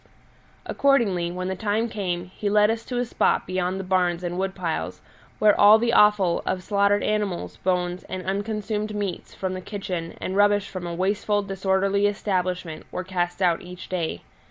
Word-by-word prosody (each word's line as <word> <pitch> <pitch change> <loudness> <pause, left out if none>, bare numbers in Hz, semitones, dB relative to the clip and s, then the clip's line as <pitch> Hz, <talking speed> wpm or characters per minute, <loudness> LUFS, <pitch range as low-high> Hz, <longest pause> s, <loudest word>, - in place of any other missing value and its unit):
Accordingly, 215 -11 +2
when 185 +1 -4
the 190 - -2
time 215 +4 0
came 180 -5 -3
he 205 - -1
led 210 +1 +4
us 225 0 -3
to 250 - -4
a 245 - +1
spot 235 - +1
beyond 185 +1 -1
the - - -3
barns 180 -2 +1
and 175 0 -3
wood 190 0 -2
piles, 170 -4 -3 0.4
where 210 -1 +5
all 205 +1 +9
the 235 +1 0
offal 210 -4 +4
of 185 - -2
slaughtered 200 +1 +2
animals, 210 -4 -2
bones, 180 -1 -1
and 185 -1 -5
unconsumed 210 +2 -2
meats 200 -4 -4
from 190 -1 -3
the 185 - -5
kitchen, 180 -4 -5
and 190 - -3
rubbish 205 0 +3
from 185 -3 -6
a 170 - -4
wasteful, 205 +3 0
disorderly 195 +1 +1
establishment, 185 -5 -2
were 185 - -3
cast 180 0 -2
out 170 -2 +2
each 180 0 -10
day. 170 - -3
190 Hz, 180 wpm, -24 LUFS, 180-205 Hz, 0.4 s, all